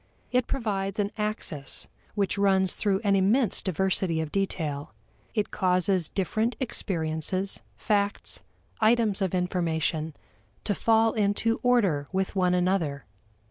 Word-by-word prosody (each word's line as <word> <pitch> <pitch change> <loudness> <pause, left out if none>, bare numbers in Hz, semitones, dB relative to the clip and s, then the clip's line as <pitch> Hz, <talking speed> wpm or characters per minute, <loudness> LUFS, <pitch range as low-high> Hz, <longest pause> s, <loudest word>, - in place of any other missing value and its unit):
It 250 -1 +2
provides 200 -6 -2
an 205 -1 0
axis 210 -10 -3 0.3
which 200 -2 0
runs 190 -2 +3
through 195 -1 0
an 200 -1 +3
immense 205 +4 +3
diversity 185 -2 0
of 160 -2 -3
detail; 155 -7 -2 0.4
it 210 -2 0
causes 185 -2 +1
different 215 +5 -1
experiences, 185 - -1 0.2
facts, 205 -1 0 0.4
items 220 -2 +3
of 190 -1 0
information 165 -3 -1 0.5
to 205 - 0
fall 225 +2 +3
into 215 +2 +1
order 200 - +2
with 190 0 -1
one 180 -1 +3
another. 175 -6 0
195 Hz, 120 wpm, -27 LUFS, 175-210 Hz, 0.5 s, runs